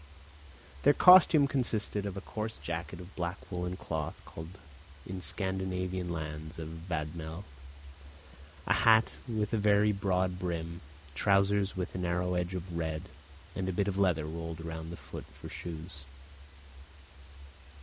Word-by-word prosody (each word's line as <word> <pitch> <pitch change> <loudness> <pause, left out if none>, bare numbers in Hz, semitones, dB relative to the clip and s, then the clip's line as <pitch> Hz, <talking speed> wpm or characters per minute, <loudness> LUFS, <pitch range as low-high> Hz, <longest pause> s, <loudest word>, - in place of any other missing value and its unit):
Their 145 - +6
costume 170 -5 +8
consisted 110 -6 -1
of 100 -1 -5
a - - -3
coarse 110 +1 -4
jacket 85 +2 -4
of 90 +1 -11
black 85 +1 -2
woollen 90 0 -2
cloth 80 -4 -3
called 80 +4 -9 0.5
in 95 0 -5
Scandinavian 95 +1 -2
lands 80 -1 -5
a 80 - -4
'vadmel,' 80 +1 -4 1.2
a - - +4
hat 110 -1 +6 0.2
with 110 -3 -1
a - - +3
very 105 0 +5
broad 95 -2 0
brim, 85 -1 -3 0.3
trousers 100 +3 +3
with 90 - -3
a - - -3
narrow 90 0 0
edge 90 +1 -1
of 90 -1 -5
red, 80 -1 -2 0.5
and 95 -1 -1
a - - -1
bit 100 +2 +1
of 100 -1 -1
leather 90 -6 +3
rolled 80 +1 -5
round 80 0 -5
the 85 - -6
foot - - -8
for - - -8
shoes. 80 -1 -7
90 Hz, 140 wpm, -32 LUFS, 80-100 Hz, 1.2 s, costume